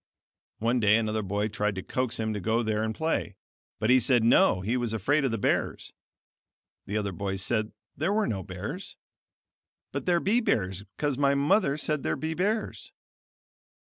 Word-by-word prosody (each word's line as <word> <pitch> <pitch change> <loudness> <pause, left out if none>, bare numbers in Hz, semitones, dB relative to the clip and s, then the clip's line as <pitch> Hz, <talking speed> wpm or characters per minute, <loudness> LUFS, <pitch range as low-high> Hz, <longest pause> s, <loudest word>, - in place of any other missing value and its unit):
One 120 +3 +1
day 105 -1 +5
another 110 -1 -1
boy 100 +2 -1
tried 105 -1 -1
to 95 - -5
coax 130 -3 -2
him 110 -1 -1
to 105 - -3
go 110 +5 +1
there 110 -1 0
and 110 0 -2
play, 160 -10 -1 0.4
but 110 +3 +2
he 130 - +7
said, 120 -1 +3
no, 105 -5 +4
he 110 +6 -1
was 120 -3 -1
afraid 140 +8 +1
of 135 - +2
the 115 - -1
bears. 100 - -1 0.9
The 105 - -2
other 100 -2 -1
boy 95 +1 -3
said 110 +2 -1 0.2
there 155 +8 0
were 215 +1 +2
no 100 - -2
bears. 100 - -7 1.0
"But - - -5
there 175 -1 +4
be 210 +7 +2
bears 95 - 0 0.2
cause 145 -3 -1
my 140 -1 +3
mother 145 +1 +2
said 150 -1 -1
there - - -1
be 160 +1 -3
bears." 205 +6 -2
115 Hz, 180 wpm, -28 LUFS, 105-145 Hz, 1.0 s, he